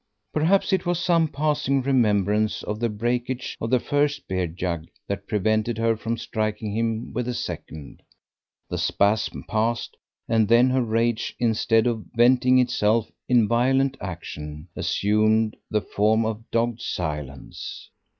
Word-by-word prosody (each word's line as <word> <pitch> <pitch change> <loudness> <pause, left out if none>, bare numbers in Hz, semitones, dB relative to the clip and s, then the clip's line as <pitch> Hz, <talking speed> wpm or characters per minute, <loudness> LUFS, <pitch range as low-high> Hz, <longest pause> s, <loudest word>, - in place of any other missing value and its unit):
Perhaps 175 +6 +2
it 190 - +2
was 175 -1 0
some 170 -2 +3
passing 140 -2 0
remembrance 105 -5 +2
of 105 +1 -4
the 120 0 0
breakage 120 +4 -2
of 115 - -2
the 125 0 +3
first 145 +3 0
beer 95 -1 -1
jug 85 -1 -4 0.2
that 100 0 -4
prevented 110 +2 0
her 115 0 +2
from 115 +2 -3
striking 110 -2 -3
him 115 +1 -2
with 120 +1 -2
the 125 - -2
second. 75 -9 -7 0.7
The - - -3
spasm 105 +2 +1
passed, 115 +2 -1 0.3
and 110 -2 +3
then 120 +3 +5
her 130 0 +2
rage, 115 0 0
instead 115 -1 +2
of 115 -3 -1
venting 125 +2 +5
itself 115 -3 +2 0.2
in 120 -4 +4
violent 130 +4 +2
action, 75 -3 -7
assumed 105 +4 +2
the 105 -1 +1
form 110 +3 +1
of 110 +1 -4
dogged 115 0 0
silence. 75 - -5
115 Hz, 140 wpm, -24 LUFS, 105-125 Hz, 0.7 s, then